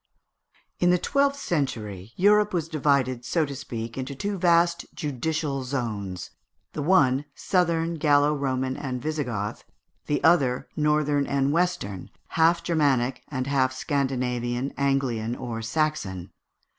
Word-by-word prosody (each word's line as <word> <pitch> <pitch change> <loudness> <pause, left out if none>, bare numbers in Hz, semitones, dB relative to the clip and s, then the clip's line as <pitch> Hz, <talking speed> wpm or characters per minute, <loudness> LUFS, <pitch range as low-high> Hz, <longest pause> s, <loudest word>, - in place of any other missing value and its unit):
In 175 - +3
the 180 - +5
twelfth 280 +7 +1
century 115 - -3
Europe 210 +1 +4
was 165 -3 -1
divided, 140 -5 +1
so 155 +6 +1
to 140 -1 -6
speak, 115 -1 -6
into 130 +2 -4
two 200 +9 -2
vast 170 -1 +3
judicial 150 0 -2
zones: 105 -9 -4 0.4
the 150 - -3
one, 145 -5 +3
Southern, 170 -2 +1
Gallo 145 -1 +4
Roman, 130 -2 -1
and 130 -3 -4
Visigoth; 125 -8 -3 0.4
the 145 - 0
other, 135 -7 +3
Northern 150 -2 +2
and 140 0 +1
Western, 160 - -1 0.2
half 165 +1 +3
Germanic 135 -7 +1
and 130 -3 -3
half 130 -1 +1
Scandinavian, 125 -2 -1
Anglian, 130 -5 0
or 120 -3 -5
Saxon. 115 - -2
140 Hz, 125 wpm, -25 LUFS, 125-160 Hz, 0.4 s, the